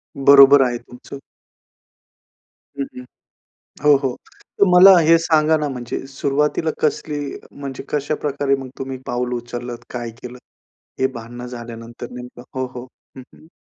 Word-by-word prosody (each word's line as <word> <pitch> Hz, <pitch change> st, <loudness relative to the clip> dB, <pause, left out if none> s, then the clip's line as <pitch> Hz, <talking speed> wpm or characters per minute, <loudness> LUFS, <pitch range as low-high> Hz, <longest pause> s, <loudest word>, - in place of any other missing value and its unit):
बरोबर 140 Hz, 0 st, +7 dB
आहे 120 Hz, -1 st, -1 dB
तुमचं. 125 Hz, +3 st, -12 dB, 1.6 s
हं, -, -, +1 dB
हं. 125 Hz, -, -8 dB, 0.8 s
हो, 150 Hz, -1 st, +6 dB
हो. 130 Hz, -2 st, -1 dB, 0.4 s
तर -, -, +6 dB
मला 185 Hz, +1 st, +9 dB
हे 165 Hz, 0 st, +5 dB
सांगा 160 Hz, -1 st, +3 dB
ना 150 Hz, -1 st, -2 dB
म्हणजे 125 Hz, -1 st, -5 dB
सुरुवातीला 145 Hz, +3 st, -1 dB
कसली 150 Hz, -1 st, -1 dB, 0.3 s
म्हणजे 140 Hz, -2 st, -7 dB
कशाप्रकारे 145 Hz, -1 st, -1 dB
मग 135 Hz, -1 st, -8 dB
तुम्ही 135 Hz, 0 st, -5 dB
पाऊल 125 Hz, 0 st, -2 dB
उचललत? 120 Hz, 0 st, -6 dB
काय 120 Hz, -1 st, -5 dB
केलंत 125 Hz, 0 st, -10 dB, 0.6 s
हे 130 Hz, -, +3 dB
भांडणं 120 Hz, +1 st, -8 dB
झाल्यानंतर 120 Hz, 0 st, -9 dB
नेमकं? 125 Hz, 0 st, -10 dB
हो, 130 Hz, 0 st, -2 dB
हो, 125 Hz, 0 st, -7 dB, 0.3 s
हं, 130 Hz, -, -9 dB
हं. -, -, -19 dB
135 Hz, 135 wpm, -20 LUFS, 125-150 Hz, 1.6 s, मला